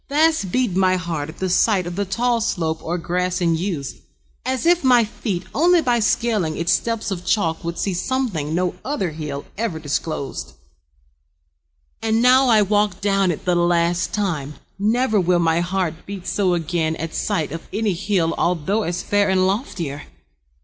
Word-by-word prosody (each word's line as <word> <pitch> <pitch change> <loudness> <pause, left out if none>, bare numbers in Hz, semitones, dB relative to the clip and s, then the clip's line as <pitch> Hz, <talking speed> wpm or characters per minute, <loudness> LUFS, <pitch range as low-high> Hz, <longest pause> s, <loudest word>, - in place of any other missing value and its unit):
Fast 300 - +2
beat 245 -6 +1
My 185 -1 +3
heart 165 -4 -3
at 155 - -10
the 190 - -2
sight 185 +1 +2
of 175 0 -5
the 200 +1 -1
tall 235 +4 0
slope 160 -7 -1
Or 175 +2 -2
grass 180 +1 -1
and 170 -2 +2
yews, 160 -5 -3 0.5
as 260 +1 -2
if 345 -1 +4
my 250 -3 +5
feet 205 -4 -4
Only 345 +4 +4
by 245 -6 +2
scaling 210 -7 +1
its 170 +1 0
steps 230 -3 0
of 180 -2 -4
chalk 180 -4 0
Would 170 0 -4
see 195 - -1
something 180 - -1
no 180 0 0
other 230 - -2
hill 150 -2 -5
Ever 225 -8 -1
disclosed. 145 - -4 1.5
And 225 0 +1
now 255 +2 +5
I 215 -3 +5
walk 205 -1 +1
Down 195 -2 +2
it 165 - -3
the 180 - +2
last 175 0 +1
time. 155 -9 -2 0.2
Never 220 +1 +2
will 180 0 +2
My 165 -1 +2
heart 175 -2 -2
beat 195 -2 -7
so 185 -3 +1
again 160 -1 -1
at 165 0 -5
sight 155 -3 -1
Of 165 +1 -7
any 215 -2 0
hill 175 -2 0
although 180 +5 +1
as 175 -3 -3
fair 205 -1 +2
And 185 -1 +3
loftier. 185 - -2
185 Hz, 175 wpm, -21 LUFS, 165-215 Hz, 1.5 s, my